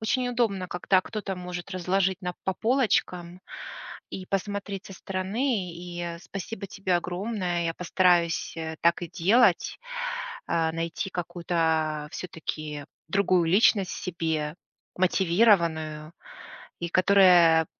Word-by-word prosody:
Очень 245 +3 0
удобно, 225 -7 0
когда 185 +1 +2
кто-то 200 -1 -5
может 180 +1 -6
разложить 190 +1 0
на 180 0 -3
по 190 - +1
полочкам 185 -8 0 0.7
и 185 - -6
посмотреть 200 0 -3
со 195 - -9
стороны. 195 +1 -2
И 175 -1 -5
спасибо 195 +2 -6
тебе 190 -1 -2
огромное. 180 -1 -2
Я 165 0 -1
постараюсь, 175 -2 +2
э, 160 -1 -4
так 170 +1 +3
и 170 - -4
делать. 205 +12 +3 0.7
А, 165 -1 +1
найти 165 +4 -3
какую-то 160 -3 -1
всё-таки 155 -4 -5 0.2
другую 185 -2 +3
личность 195 +1 +4
в - - -6
себе, 160 -4 -2 0.4
мотивированную, 170 -5 +2 0.7
и 170 - -2
которая 180 -3 +6
180 Hz, 115 wpm, -27 LUFS, 170-195 Hz, 0.7 s, которая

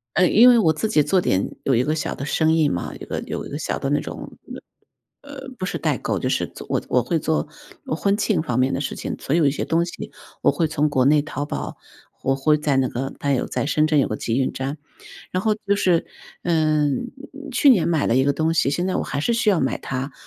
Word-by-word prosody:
呃， 180 +1 +4
因 240 +4 +7
为 245 - +7
我 165 -6 +4
自 160 +8 -2
己 150 -7 +3
做 185 +5 +2
点 95 - -1
有 135 - +2
一 120 - +3
个 150 +4 0
小 155 - -2
的 140 - -6
生 160 +2 +2
意 155 -3 +3
嘛， 85 - -3
有 - - -12
一 - - -6
个 - - -4
有 - - -5
一 - - -8
个 145 - -4
小 - - -2
的 135 - -2
那 145 - +2
种， - - -8 0.8
呃， 285 0 -12
呃， 270 - -10
不 185 - -3
是 - - -3
代 - - 0
购， - - -2
就 - - -1
是 - - 0
做 - - -11
我 - - +1
我 125 - +2
会 160 +7 0
做 155 0 -1 0.4
婚 200 +6 0
庆 210 - +1
方 125 -6 -2
面 130 +1 +2
的 - - -1
事 145 - -3
情。 - - -5
所 140 - -2
以 170 - +3
一 - - +2
些 135 - -3
东 165 +1 +1
西 175 - -8 0.3
我 - - +3
会 160 +2 0
从 150 0 +1
国 130 -3 +2
内 150 +2 +5
淘 145 0 -4
宝， 145 - -5 0.5
我 135 0 +1
会 150 +2 +3
在 150 -2 0
那 135 -1 +2
个， 130 +2 -4
它 140 - 0
有 130 - 0
在 - - -2
深 155 +1 +2
圳 155 -1 +3
有 135 - +3
个 110 - -3
集 115 +3 -1
运 130 - 0
站， 135 +3 -4 0.5
然 185 - -1
后 215 0 +1
就 200 - +3
是 180 -4 +2 0.4
嗯， 155 - +1 0.4
去 265 +3 +3
年 180 -10 +4
买 160 -4 +1
了 115 - +2
一 130 - +4
个 140 +1 +2
东 160 +2 0
西， 155 -4 +2
现 175 +6 -1
在 185 - -1
我 - - 0
还 140 0 -4
是 235 - +1
需 225 -2 +2
要 185 - +2
买 135 - -1
它， 135 +1 -4
150 Hz, 285 characters per minute, -22 LUFS, 135-170 Hz, 0.8 s, 因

